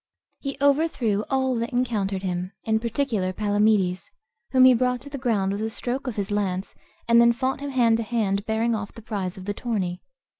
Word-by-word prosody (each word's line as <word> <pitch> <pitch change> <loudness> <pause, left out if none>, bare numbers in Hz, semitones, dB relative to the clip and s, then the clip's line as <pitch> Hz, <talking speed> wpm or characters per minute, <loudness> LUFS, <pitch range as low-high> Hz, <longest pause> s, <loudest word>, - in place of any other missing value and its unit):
He 275 -1 -5
overthrew 275 -8 +2
all 265 -1 +1
that 230 +1 -2
encountered 210 -6 -1
him, 180 +1 -3
in 220 0 +1
particular 230 -5 -1
Palamedes, 205 -2 +1 0.4
whom 260 -1 +6
he 255 - +8
brought 250 +1 +1
to 285 - -11
the 280 - -5
ground 215 -7 +1
with 200 +1 -3
a 220 - -1
stroke 255 +4 -4
of 245 - -3
his 200 -1 -3
lance, 195 -2 -1 0.3
and 235 0 +6
then 235 0 +6
fought 260 +2 -1
him 285 0 -4
hand 235 -4 +3
to 230 - -2
hand, 210 -3 0
bearing 225 +1 +1
off 205 -2 -3
the 230 - -12
prize 195 -5 -4
of 185 - -9
the 205 - -2
tourney. 195 -6 -3
220 Hz, 200 wpm, -24 LUFS, 200-250 Hz, 0.4 s, he